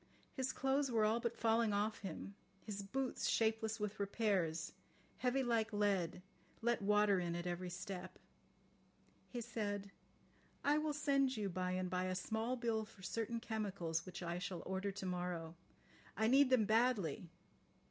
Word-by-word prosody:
His 260 -1 0
clothes 270 +1 +1
were 225 -3 +3
all 220 +2 +3
but 235 0 -2
falling 225 -1 +3
off 210 +2 0
him, 195 +1 -6 0.3
his 205 -2 -4
boots, 255 +6 -1
shapeless 220 -1 +1
with 210 0 -3
repairs, 195 -6 0 0.4
heavy 255 +1 +1
like 230 -3 +1
lead, 195 -4 +1 0.4
let 235 -1 +2
water 205 -1 +4
in 170 -1 -1
at 175 0 -3
every 180 +1 -2
step. 185 0 -6 1.1
He 245 - -4
said: 205 -3 -3 0.7
"I 295 +1 +4
will 305 -1 0
send 275 -3 +2
you 205 -2 -1
by 185 0 -1
and 185 0 0
by 180 +1 0
a 185 0 -1
small 220 +6 -1
bill 230 -3 0
for 205 -3 -14
certain 230 +3 -2
chemicals 200 -8 -2
which 185 -1 -7
I 170 +1 -2
shall 180 -1 -4
order 190 +2 -1
to 195 0 -6
morrow. 175 -3 -2 0.6
I 220 - +2
need 265 +4 +6
them 250 -5 +5
badly. 215 - +2
210 Hz, 160 wpm, -39 LUFS, 185-235 Hz, 1.1 s, need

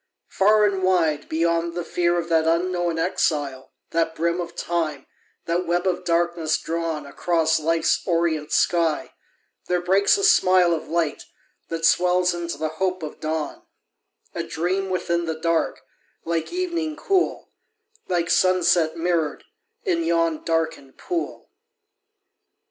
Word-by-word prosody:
Far 210 +2 +4
and 195 -2 0
wide, 170 -5 +1
Beyond 170 +1 0
the 175 - -2
fear 175 +1 0
of 170 -1 -2
that 160 -1 +2
unknown 175 0 0
exile, 145 -6 -1 0.2
That 165 -1 0
brim 170 +2 0
of 170 - -7
Time, 155 -5 -2 0.4
that 175 +1 -1
web 175 +1 0
of 180 -1 0
darkness 170 -2 +1
drawn 165 -2 -3
Across 160 +2 +1
Life's 165 +1 +1
orient 165 -3 0
sky, 165 -3 +1 0.5
there 180 0 +1
breaks 195 - +3
a 400 - -2
smile 185 - +5
Of 160 - -4
light 165 -2 -1 0.4
that 165 0 -2
swells 180 +1 +3
into 170 0 -4
the 155 - -2
hope 185 -2 0
of 155 - -7
dawn: 155 -1 -3 0.7
A - - -3
dream 185 +4 -2
within 170 -2 -1
the 160 -1 -3
dark, 165 0 0 0.4
like 165 -1 -2
evening 340 -3 -2
cool, 375 +3 0 0.6
Like 170 -2 0
sunset 175 -3 +3
mirror'd 165 -3 -1 0.4
in 170 0 0
yon 165 -1 +1
darken'd 165 -5 -2
pool. 345 -2 -4
170 Hz, 135 wpm, -23 LUFS, 160-180 Hz, 0.7 s, smile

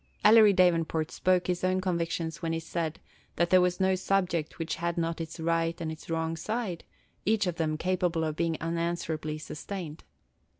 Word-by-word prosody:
Ellery 215 0 +8
Davenport 165 -4 +2
spoke 185 -1 +2
his 180 0 -1
own 185 0 +2
convictions 170 -3 -2
when 165 -1 -1
he 165 - -1
said 165 -1 -3 0.4
that 170 0 +1
there 185 -1 +7
was 180 0 +1
no 190 0 +3
subject 180 -4 0
which 165 -1 -3
had 170 +1 -2
not 165 0 -1
its 165 0 -7
right 165 +1 0
and 160 -2 -3
its 160 - -10
wrong 165 0 -1
side, 210 0 -3 0.4
each 215 -1 +2
of 175 -2 -2
them 155 -2 0
capable 180 -1 0
of 155 -1 -1
being 165 -1 0
unanswerably 165 -2 -2
sustained. 155 +1 -7
170 Hz, 175 wpm, -29 LUFS, 160-185 Hz, 0.4 s, Ellery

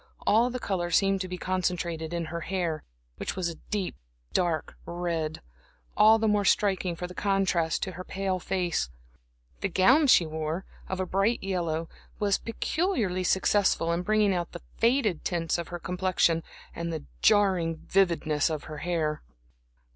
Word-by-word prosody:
All 230 +4 +4
the 250 - -3
color 180 -6 -2
seemed 195 +1 +3
to 185 - -3
be 180 0 -5
concentrated 175 -3 -2
in 170 -1 -2
her 170 - -3
hair, 170 -3 -2 0.3
which - - -4
was 185 -2 -1
a 165 - -8
deep, 205 - -2 0.4
dark 170 -3 0
red, 170 -3 -3 0.5
all 220 +1 +7
the 220 0 +1
more 210 -1 +3
striking 190 -3 +2
for 180 - -5
the 180 - -8
contrast 185 -4 +1
to 190 - -3
her 185 +1 -7
pale 190 0 -2
face. 180 - -1 0.7
The 195 - -1
gown 255 - +5
she 180 -9 +6
wore, 160 +3 -3 0.2
of 190 - -3
a 185 - 0
bright 195 +6 +1
yellow, 170 -4 -1 0.3
was 200 -2 +1
peculiarly 230 - -1
successful 190 -2 +2
in 170 - 0
bringing 215 0 +2
out 175 -2 -3
the 175 - -8 0.2
faded 230 - +2
tints 170 -1 -1
of 170 - -4
her 175 - -5
complexion 180 -2 +1 0.3
and 170 0 -3
the 160 -3 -4 0.2
jarring 190 -6 +3
vividness 170 -5 +1
of 155 -2 -3
her 155 -1 -8
hair. 160 -3 -1
180 Hz, 160 wpm, -28 LUFS, 170-195 Hz, 0.7 s, all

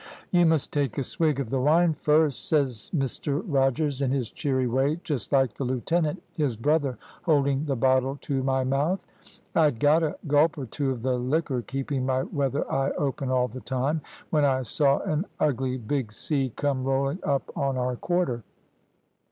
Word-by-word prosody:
`You 175 -1 +5
must 160 -3 +1
take 140 -6 0
a 140 - 0
swig 155 0 0
of 130 -5 -3
the 135 -1 +1
wine 160 +4 +4
first,' 150 -2 +1
says 135 -8 0
Mr 140 -1 -1
Rogers, 140 - +1
in 135 - +1
his 130 -4 -1
cheery 130 -3 0
way, 135 +6 +1
just 145 -7 -3
like 135 -5 +3
the - - -4
lieutenant, 155 +7 -1
his 145 -7 0
brother, 140 +2 +1 0.2
holding 140 -3 +2
the 140 -3 0
bottle 130 +2 +2
to 135 -2 -1
my 130 0 +1
mouth. 140 +8 +1 0.5
I'd 150 -8 +3
got 150 +4 +4
a 155 -2 -1
gulp 150 +2 +3
or 140 - -4
two 135 +4 -2
of 125 -3 -3
the 125 -1 +1
liquor, 130 0 0
keeping 135 +1 -3
my 130 0 +1
weather 140 0 -1
eye 135 +1 +1
open 135 -2 -1
all 125 -1 +2
the 125 +3 -9
time, 135 +4 -1 0.3
when 150 -2 +3
I 130 -2 +2
saw 140 +2 +2
an 155 +6 -1
ugly 130 -3 0
big 125 -1 -2
sea 135 +2 -1
come 140 -3 -1
rolling 135 +4 0
up 140 -2 -1
on 135 -2 0
our 125 0 -1
quarter. 175 -5 -1
135 Hz, 180 wpm, -26 LUFS, 130-150 Hz, 0.5 s, `You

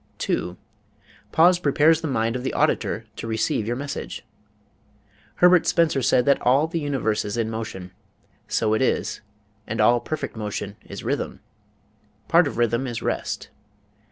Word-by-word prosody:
2. - - -2 0.7
Pause 175 +2 +5
Prepares 155 0 +3
the 160 - -2
Mind 115 -3 0
of 125 - -2
the 130 - -2
Auditor - - 0
to - - -6
Receive 110 -1 -1
Your 120 - -1
Message 140 +2 -6 1.1
Herbert 180 -1 +5
Spencer 160 -5 +2
said 125 0 +3
that 140 - +3
all 135 +5 +4
the 165 +1 -3
universe 135 -8 -1
is 105 +3 -4
in 115 -1 -1
motion. 95 -5 -6 0.6
So 110 -1 +1
it 110 - +1
is 130 - 0 0.5
and 110 - -4
all 120 +3 +5
perfect 155 +4 -5
motion 105 -2 -4
is - - -8
rhythm. - - -3 0.9
Part - - +5
of - - -5
rhythm 120 +2 +1
is 120 -2 -5
rest. - - -3
120 Hz, 155 wpm, -23 LUFS, 110-145 Hz, 1.1 s, Pause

